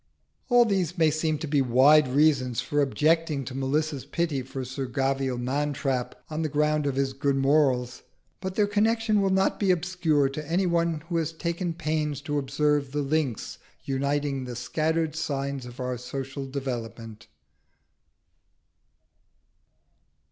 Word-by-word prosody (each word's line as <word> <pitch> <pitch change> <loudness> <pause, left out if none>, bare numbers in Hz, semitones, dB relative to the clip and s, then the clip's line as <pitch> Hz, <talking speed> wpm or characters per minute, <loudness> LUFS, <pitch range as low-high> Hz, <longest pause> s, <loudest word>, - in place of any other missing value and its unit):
All 245 -1 +6
these 190 -4 0
may 160 -2 +4
seem 155 0 0
to 160 +2 -5
be 145 -1 +2
wide 135 +4 +5
reasons 130 -3 +2
for 145 +3 0
objecting 150 +2 +1
to 125 - -6
Melissa's 140 +2 -1
pity 165 -6 -1
for 130 0 -6
Sir 130 +1 -4
Gavial 135 0 -1
Mantrap 135 -1 -1
on 155 +1 -3
the 155 - -1
ground 150 0 +1
of 140 - -1
his 135 0 0
good 140 +1 0
morals; 135 -3 +2 0.4
but 190 0 -5
their 210 - +3
connection 215 +1 +2
will 195 - +2
not 190 0 +1
be 200 - +1
obscure 175 -5 +2
to 150 +2 -7
any 185 +3 +2
one 170 -2 +1
who 170 - 0
has 165 -1 -1
taken 170 +1 -3
pains 155 -3 -1
to 145 0 -1
observe 145 0 0
the 145 0 0
links 140 -5 -2 0.2
uniting 140 0 -1
the 125 -1 -6
scattered 155 +6 -1
signs 140 -4 -3
of 120 +1 -12
our 125 -1 -3
social 135 +2 -5
development. 115 -5 -6
145 Hz, 150 wpm, -26 LUFS, 135-160 Hz, 0.4 s, All